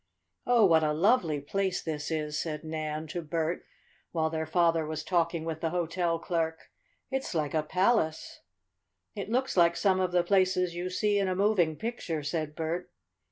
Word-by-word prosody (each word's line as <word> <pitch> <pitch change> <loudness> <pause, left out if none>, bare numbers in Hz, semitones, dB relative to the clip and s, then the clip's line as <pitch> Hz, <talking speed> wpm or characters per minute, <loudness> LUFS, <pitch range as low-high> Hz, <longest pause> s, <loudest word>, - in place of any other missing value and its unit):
"Oh, 240 -3 +5
what 165 -3 +5
a 150 -1 +2
lovely 170 - +2
place 190 +6 -1
this 150 -2 -3
is," 155 -2 -2
said 150 -1 -3
Nan 155 -1 -4
to 175 - -3
Bert, 165 +1 -2 0.5
while 160 -2 0
their 160 -1 -2
father 165 0 +3
was 155 0 -4
talking 170 -2 0
with 160 -1 -4
the 165 - 0
hotel 170 0 0
clerk. 165 -1 -3 0.4
"It's 265 -8 -2
like 150 -3 -1
a 155 - +2
palace." 180 0 0 0.7
"It 200 0 -5
looks 255 +3 0
like 170 -2 +5
some 190 -2 +2
of 185 -1 0
the 175 -1 +3
places 185 -1 +2
you 175 +1 -3
see 205 +2 +1
in 195 - +1
a 185 - 0
moving 190 -5 +2
picture," 175 -8 -4
said 150 0 -3
Bert. 165 +2 -3
170 Hz, 175 wpm, -29 LUFS, 160-185 Hz, 0.7 s, Oh